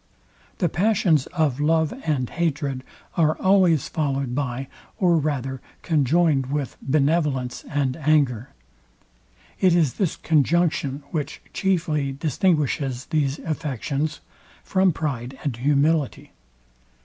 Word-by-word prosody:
The 175 Hz, -, +1 dB
passions 180 Hz, -, +2 dB
of 155 Hz, -7 st, 0 dB
love 160 Hz, +1 st, +2 dB
and 135 Hz, -5 st, +1 dB
hatred 145 Hz, -5 st, -2 dB, 0.3 s
are 155 Hz, -2 st, +2 dB
always 185 Hz, -6 st, +4 dB
followed 140 Hz, -5 st, -1 dB
by, 135 Hz, -1 st, -2 dB, 0.3 s
or 175 Hz, -3 st, +3 dB
rather 135 Hz, -4 st, -2 dB, 0.2 s
conjoined 155 Hz, -2 st, +2 dB
with 140 Hz, -1 st, -3 dB
benevolence 140 Hz, -3 st, 0 dB
and 140 Hz, -3 st, 0 dB
anger. 140 Hz, -5 st, +1 dB, 1.1 s
It 185 Hz, -2 st, +4 dB
is 155 Hz, -7 st, +2 dB
this 190 Hz, -6 st, -1 dB
conjunction, 155 Hz, -2 st, +1 dB
which 155 Hz, -1 st, -3 dB
chiefly 160 Hz, -8 st, 0 dB
distinguishes 145 Hz, -4 st, 0 dB
these 145 Hz, -2 st, +1 dB
affections 150 Hz, 0 st, -2 dB, 0.4 s
from 190 Hz, -1 st, +2 dB
pride 135 Hz, -5 st, -4 dB
and 140 Hz, -6 st, -1 dB
humility. 145 Hz, +2 st, +1 dB
150 Hz, 105 wpm, -23 LUFS, 135-165 Hz, 1.1 s, always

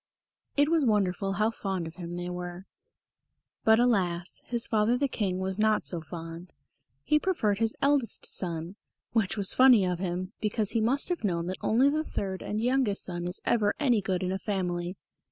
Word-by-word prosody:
It 290 Hz, +1 st, +4 dB
was 330 Hz, -2 st, +3 dB
wonderful 195 Hz, -4 st, +1 dB
how 215 Hz, +3 st, +1 dB
fond 190 Hz, -6 st, -3 dB
of 160 Hz, -, -7 dB
him 175 Hz, -1 st, -6 dB
they 175 Hz, 0 st, -4 dB
were. 180 Hz, +1 st, -6 dB, 1.0 s
But 220 Hz, +1 st, +5 dB
alas! 180 Hz, -8 st, +1 dB
his 235 Hz, -1 st, +2 dB
father 220 Hz, +2 st, +2 dB
the 280 Hz, +2 st, +1 dB
King 195 Hz, -7 st, -2 dB
was 190 Hz, +1 st, -2 dB
not 215 Hz, 0 st, +3 dB
so 170 Hz, -2 st, -1 dB
fond. 165 Hz, +2 st, -9 dB, 0.5 s
He 300 Hz, -, +3 dB
preferred 220 Hz, -, 0 dB
his 225 Hz, 0 st, +1 dB
eldest 280 Hz, -4 st, +2 dB
son; 170 Hz, +1 st, -2 dB, 0.3 s
which 220 Hz, -3 st, 0 dB
was 200 Hz, -2 st, 0 dB
funny 255 Hz, -6 st, +6 dB
of 180 Hz, -1 st, -1 dB
him, 185 Hz, +1 st, -3 dB
because 210 Hz, -1 st, 0 dB
he 230 Hz, -, +1 dB
must 260 Hz, +9 st, +2 dB
have 355 Hz, -7 st, -2 dB
known 170 Hz, -4 st, 0 dB
that 185 Hz, +1 st, -4 dB
only 245 Hz, +5 st, +3 dB
the 305 Hz, +2 st, +1 dB
third 190 Hz, -9 st, -4 dB
and 210 Hz, -, -3 dB
youngest 245 Hz, -3 st, +1 dB
son 175 Hz, -1 st, -3 dB
is 180 Hz, -, -3 dB
ever 210 Hz, -3 st, +2 dB
any 245 Hz, -7 st, +3 dB
good 190 Hz, -1 st, -1 dB
in 185 Hz, -, -1 dB
a 190 Hz, -, -2 dB
family. 180 Hz, -3 st, -2 dB
200 Hz, 190 wpm, -28 LUFS, 180-230 Hz, 1.0 s, funny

